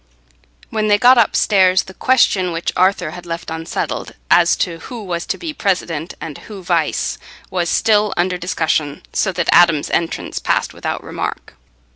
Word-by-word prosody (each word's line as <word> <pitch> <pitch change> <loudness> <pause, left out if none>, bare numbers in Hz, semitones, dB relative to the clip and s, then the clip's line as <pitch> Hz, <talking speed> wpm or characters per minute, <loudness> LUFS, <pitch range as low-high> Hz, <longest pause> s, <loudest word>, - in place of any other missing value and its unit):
When 215 -1 0
they 205 -1 +4
got 245 +3 +6
upstairs, 190 -4 +3
the 190 - -12
question 190 -7 +2
which 165 0 -2
Arthur 185 -3 +2
had 175 +1 -10
left 165 0 -5
unsettled, 160 0 -4 0.2
as - - +5
to 170 -2 -2
who 235 +5 -8
was 175 -3 -4
to - - -2
be 325 -3 -5
president, 180 - -2
and 150 -3 -7
who 200 -3 -10
vice, 170 -3 0 0.3
was 175 -2 -1
still 210 -2 +2
under 180 +1 0
discussion, 160 -4 -1
so 195 - +1
that 175 -1 -2
Adam's 170 -4 +4
entrance 170 -1 -2
passed - - 0
without - - -4
remark. - - -5
180 Hz, 160 wpm, -18 LUFS, 165-205 Hz, 0.3 s, got